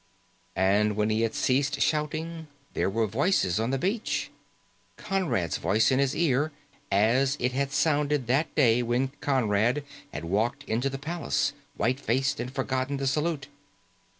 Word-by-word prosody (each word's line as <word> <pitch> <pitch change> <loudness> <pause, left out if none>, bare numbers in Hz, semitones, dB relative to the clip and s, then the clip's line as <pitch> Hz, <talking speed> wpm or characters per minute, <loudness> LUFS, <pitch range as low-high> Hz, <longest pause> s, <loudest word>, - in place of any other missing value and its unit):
And 100 +3 +2
when 105 +1 +1
he 110 +1 +1
had 115 -1 0
ceased 140 +2 +1
shouting, 160 +2 -1 0.3
there - - 0
were 110 +3 +1
voices 110 - +1
on 115 +2 0
the 135 - 0
beach. 200 - -1 0.7
Conrad's 160 - -1
voice 110 +4 +2
in 130 - +3
his 140 -1 +1
ear, 155 -2 +1 0.4
as 125 +8 +3
it 125 +1 0
had 135 +1 -1
sounded 145 -2 +1
that 135 +7 0
day 120 -4 +4
when 120 +2 0
Conrad 120 0 +1 0.3
had 85 - -6
walked 115 +10 0
into 120 +2 -1
the 135 - -5
palace, 165 +5 -1 0.2
white 125 +4 +1
faced, 135 +2 0
and 125 - -4
forgotten 130 0 -2
the 135 - -3
salute. 150 +2 -1
130 Hz, 150 wpm, -27 LUFS, 115-145 Hz, 0.7 s, day